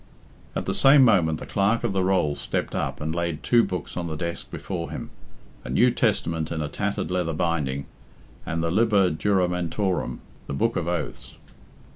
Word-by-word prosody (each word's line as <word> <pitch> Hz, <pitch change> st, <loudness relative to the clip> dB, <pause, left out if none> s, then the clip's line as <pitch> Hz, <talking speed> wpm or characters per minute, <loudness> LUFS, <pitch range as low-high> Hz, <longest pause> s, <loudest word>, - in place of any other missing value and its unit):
At -, -, -2 dB
the -, -, -1 dB
same 135 Hz, 0 st, +7 dB
moment 85 Hz, -9 st, +3 dB
the -, -, -7 dB
Clerk 100 Hz, +4 st, +1 dB
of 115 Hz, -4 st, 0 dB
the 95 Hz, -1 st, +1 dB
Rolls 90 Hz, -6 st, +1 dB
stepped -, -, -2 dB
up -, -, -2 dB
and 80 Hz, +1 st, -2 dB
laid 85 Hz, -2 st, -2 dB
two 120 Hz, -1 st, +4 dB
books 90 Hz, -4 st, -4 dB
on 85 Hz, -1 st, -3 dB
the 80 Hz, -, -4 dB
desk 85 Hz, +1 st, -4 dB
before 85 Hz, -3 st, -5 dB
him -, -, -6 dB, 0.5 s
a -, -, -8 dB
New -, -, +4 dB
Testament 80 Hz, -1 st, 0 dB
in 80 Hz, -, -2 dB
a 75 Hz, -, -1 dB
tattered 100 Hz, +1 st, -2 dB
leather 90 Hz, -3 st, 0 dB
binding, 75 Hz, -5 st, -1 dB, 0.6 s
and 80 Hz, 0 st, -2 dB
the 85 Hz, -, 0 dB
Liber 100 Hz, -2 st, +3 dB
Juramentorum, 90 Hz, +1 st, 0 dB, 0.3 s
the 70 Hz, -, -3 dB
Book 70 Hz, -, +1 dB
of 80 Hz, -, -1 dB
Oaths. 85 Hz, -3 st, -4 dB
85 Hz, 180 wpm, -25 LUFS, 80-100 Hz, 0.6 s, same